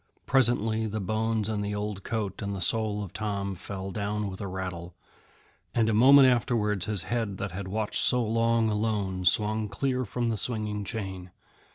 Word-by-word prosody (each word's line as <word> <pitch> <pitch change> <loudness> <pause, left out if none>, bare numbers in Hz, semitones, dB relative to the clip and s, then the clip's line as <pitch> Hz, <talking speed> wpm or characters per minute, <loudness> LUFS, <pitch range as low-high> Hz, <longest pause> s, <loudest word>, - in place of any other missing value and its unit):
Presently, 115 -4 +2
the 110 +1 -3
bones 110 +2 0
and 105 -2 -2
the 105 0 -2
old 105 -1 -4
coat 110 -4 -3
and 100 -1 -3
the - - -4
soul 105 +2 0
of 95 - -9
Tom 100 -2 -2
fell 95 +1 -6
down 105 +1 -2
with 95 - -8
a 100 - -3
rattle, 90 -2 -5 0.8
and 115 -1 +3
a - - +2
moment 135 +5 +8
afterwards 110 -5 +1
his 105 -5 0
head 115 -5 -2
that 95 0 -4
had 95 +2 -5
watched 105 +2 -1
so 125 -1 +4
long 115 +1 +2
alone 105 -4 -1
swung 105 +3 +2
clear 130 +6 -1
from 120 +2 -2
the 110 - -1
swinging 105 -1 -1
chain. 95 -4 -5
105 Hz, 180 wpm, -28 LUFS, 100-115 Hz, 0.8 s, moment